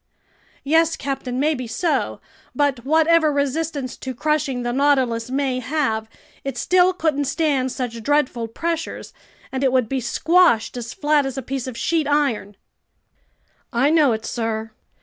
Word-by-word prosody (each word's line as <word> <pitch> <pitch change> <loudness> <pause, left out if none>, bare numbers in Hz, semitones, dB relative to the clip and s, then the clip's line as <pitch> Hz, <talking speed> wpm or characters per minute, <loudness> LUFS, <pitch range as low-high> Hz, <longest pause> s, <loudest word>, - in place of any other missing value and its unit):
"Yes, 325 +3 +3
captain, 265 -2 -4
maybe 285 -4 0
so. 320 +8 -1 0.3
But 280 -5 +1
whatever 320 +2 +4
resistance 285 -1 -2
to 260 -1 -6
crushing 295 -3 0
the 240 0 -2
Nautilus 260 -4 +2
may 265 -1 0
have, 245 -5 -1 0.3
it 275 -3 -4
still 365 +7 +4
couldn't 310 -5 0
stand 275 -3 0
such 240 -3 -4
dreadful 255 -3 0
pressures, 330 +8 -4 0.4
and 265 +1 -2
it 265 - +3
would 255 -3 +2
be 265 +2 -2
squashed 310 -1 +3
as 235 -2 -6
flat 295 -2 +2
as 270 0 -6
a 265 - -3
piece 265 0 -4
of 250 -3 -6
sheet 320 -3 0
iron." 265 -9 0 1.1
"I 265 +5 +2
know 305 -5 +4
it, 220 0 -3
sir. 225 -1 -3
270 Hz, 150 wpm, -21 LUFS, 245-305 Hz, 1.1 s, whatever